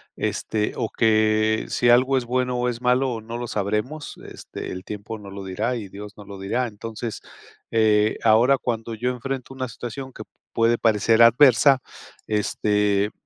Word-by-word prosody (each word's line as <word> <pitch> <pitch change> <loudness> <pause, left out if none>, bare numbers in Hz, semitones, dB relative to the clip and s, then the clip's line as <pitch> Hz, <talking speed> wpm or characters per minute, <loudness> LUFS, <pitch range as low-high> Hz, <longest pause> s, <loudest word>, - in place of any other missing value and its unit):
Este 105 -1 -2
o 115 -3 -1
que 110 -1 +2
si 120 - +2
algo 130 +3 +5
es 125 - -2
bueno 125 +1 -1
o 125 0 0
es 120 0 -5
malo, 125 -1 +1
no 115 +2 -6
lo 120 - -4
sabremos. 105 +8 -3
Este, - - -8
el 90 0 -6
tiempo 105 +2 -7
no 100 -1 -11
lo 100 0 -8
dirá 105 +7 -2
y 105 -5 -6
Dios 105 +2 -10
nos 105 - -11
lo 100 -1 -9
dirá. 100 +6 -1
Entonces, 115 +1 -6 0.5
eh, 110 -1 +3
ahora, 115 +5 +5
cuando 115 -2 -3
yo 125 +3 -1
enfrento 130 +1 -5
una 130 -1 -4
situación 125 +3 -7
que 110 - -9 0.3
puede 115 +1 +2
parecer 110 0 +3
adversa, 130 +2 +6 0.4
este, 105 -1 +1
115 Hz, 170 wpm, -23 LUFS, 105-125 Hz, 0.5 s, adversa